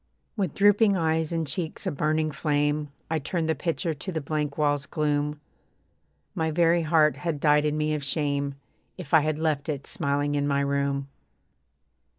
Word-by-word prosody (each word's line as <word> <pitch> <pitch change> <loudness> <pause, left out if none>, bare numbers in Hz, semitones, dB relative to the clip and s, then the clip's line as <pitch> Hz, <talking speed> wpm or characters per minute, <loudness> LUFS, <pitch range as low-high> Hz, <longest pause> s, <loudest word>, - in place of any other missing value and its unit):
With 190 -8 -2
drooping 205 0 +4
eyes, 160 -1 0
and 165 -1 -1
cheeks 160 +6 -3
a 185 - 0
burning 155 +1 0
flame, 150 0 0 0.2
I 160 - +1
turned 165 +3 -2
the 160 - +2
picture 165 +2 -2
to 155 +6 -6
the 165 - -2
blank 150 -1 -3
wall's 145 -2 +1
gloom. 150 -1 -1 0.9
My 160 0 -1
very 170 +1 +3
heart 155 -1 +3
had 165 -4 -3
died 150 0 +4
in 150 0 0
me 155 0 0
of 150 -2 -3
shame, 140 -1 -1 0.4
If 175 -6 -9
I 160 - +8
had 155 0 -1
left 155 -2 -1
it 140 -3 -3
smiling 145 +1 -1
in 145 0 0
my 140 -1 +1
room. 140 0 -1
150 Hz, 170 wpm, -26 LUFS, 145-160 Hz, 0.9 s, I